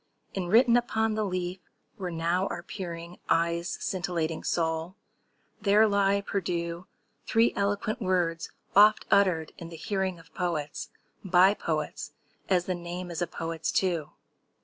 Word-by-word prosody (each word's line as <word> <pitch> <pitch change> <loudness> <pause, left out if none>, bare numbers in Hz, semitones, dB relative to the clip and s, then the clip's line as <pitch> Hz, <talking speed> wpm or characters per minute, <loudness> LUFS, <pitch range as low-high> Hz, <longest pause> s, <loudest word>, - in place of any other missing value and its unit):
Enwritten 225 +6 +4
upon 225 -2 +1
the 215 0 0
leaf 180 -1 -2 0.4
where 185 -2 -4
now 170 +3 0
are 175 - -5
peering 170 -2 -7
Eyes 170 +1 +1
scintillating 170 -3 -2
soul, 165 +1 -1 0.7
there 210 +1 +5
lie 200 -1 +2
perdus 175 -2 -2 0.4
Three 225 +1 +3
eloquent 205 +4 -1
words 175 -4 0 0.3
oft 210 +2 +6
uttered 180 -6 +3
in 170 - -7
the 165 - -9
hearing 190 +1 -2
Of 165 - -18
poets, 160 -5 -3 0.3
by 190 +1 +5
poets—as 170 +2 -3
the 185 - -1
name 175 +1 -6
is 170 - -4
a 175 - +1
poet's, 165 -1 -3
too. 175 -5 0
180 Hz, 130 wpm, -28 LUFS, 170-200 Hz, 0.7 s, oft